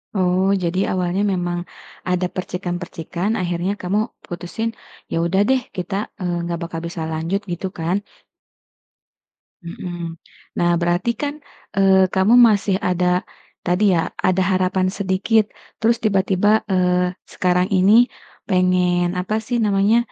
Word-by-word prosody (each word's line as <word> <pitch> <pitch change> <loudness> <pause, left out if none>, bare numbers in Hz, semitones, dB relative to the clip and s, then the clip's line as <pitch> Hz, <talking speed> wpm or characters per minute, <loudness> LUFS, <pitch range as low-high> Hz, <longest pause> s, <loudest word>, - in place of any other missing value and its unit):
Oh, 185 0 +2 0.2
jadi 175 +2 0
awalnya 180 +1 0
memang, 175 -1 -1 0.5
ada 180 0 +1
percikan-percikan 180 0 -4
akhirnya 175 +1 -1
kamu 185 +3 0 0.3
putusin, 175 +6 -4 0.4
"Ya - - 0
udah 190 +3 +2
deh, 265 -1 +3 0.2
kita, 185 +2 -3 0.3
eee, 175 -1 -1
nggak 170 0 -3
bakal 165 -1 -5
bisa 170 -1 -6
lanjut," 165 +6 -1
gitu 175 +2 -3
kan? 180 +5 -1 1.6
Mhm, 170 -1 -6 0.4
nah 175 - +3
berarti 175 +6 +1
kan, 290 -1 -1 0.4
eee, 190 -1 +4
kamu 190 +4 +4 0.2
masih 200 -2 +1
ada, 180 0 +1 0.6
tadi 180 +3 +1
ya, - - +2 0.3
ada 185 0 +2
harapan 185 0 +1
sedikit 200 +3 +2 0.4
terus 230 +1 +3
tiba-tiba, 195 -1 +2 0.2
eee, 180 -1 +2 0.2
sekarang 180 0 +2
ini 195 +2 +4 0.6
pengen 180 -1 +2
apa 185 +4 -2
sih 245 - 0
namanya, 200 +2 +3
185 Hz, 125 wpm, -21 LUFS, 175-195 Hz, 1.6 s, eee